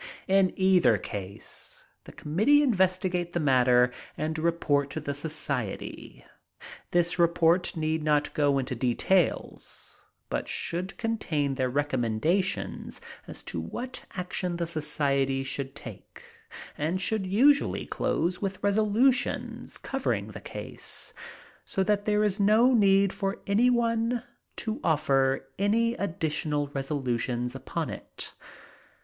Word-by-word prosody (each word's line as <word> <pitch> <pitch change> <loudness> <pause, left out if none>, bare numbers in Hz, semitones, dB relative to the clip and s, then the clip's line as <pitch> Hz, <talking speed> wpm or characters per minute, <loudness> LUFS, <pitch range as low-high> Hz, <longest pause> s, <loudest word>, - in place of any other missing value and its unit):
In 190 -1 +4
either 180 - +4
case 100 0 -7 0.2
the - - -10
committee 215 - +3
investigate 185 -6 +1
the 175 - 0
matter 125 -4 +4 0.3
and 160 +1 -2
report 155 -4 +1
to 150 - -4
the 145 -2 -3
society. 140 -7 -5 0.6
This 175 0 +1
report 170 +1 +3
need 160 0 0
not 150 -1 +1
go 145 -2 +2
into 130 0 -2
details, 130 +9 -1 0.3
but - - -3
should 180 +3 -3
contain 160 - -1
their 130 -1 0
recommendations 145 - -1 0.3
as - - -9
to - - -4
what 255 +2 -6
action 180 -1 -2
the 170 - -1
society 140 -4 0
should 135 0 -4
take, 115 -8 -10 0.6
and 165 +5 0
should 200 0 -1
usually 270 +9 +3
close 180 +2 -1
with 195 -2 -2
resolutions 215 +6 +1
covering - - -2
the - - -9
case, - - -5 0.5
so 190 - -1
that 205 +1 +1
there 210 0 +2
is 210 0 0
no 220 +5 +5
need 195 -3 +4
for 195 -1 -2
any 220 +5 +4
one 230 0 +1 0.3
to 220 +3 -3
offer 135 -4 +2
any 230 +4 +2
additional 155 - -2
resolutions 125 -3 -2
upon 135 +1 -4
it. - - -7
170 Hz, 120 wpm, -28 LUFS, 140-200 Hz, 0.6 s, no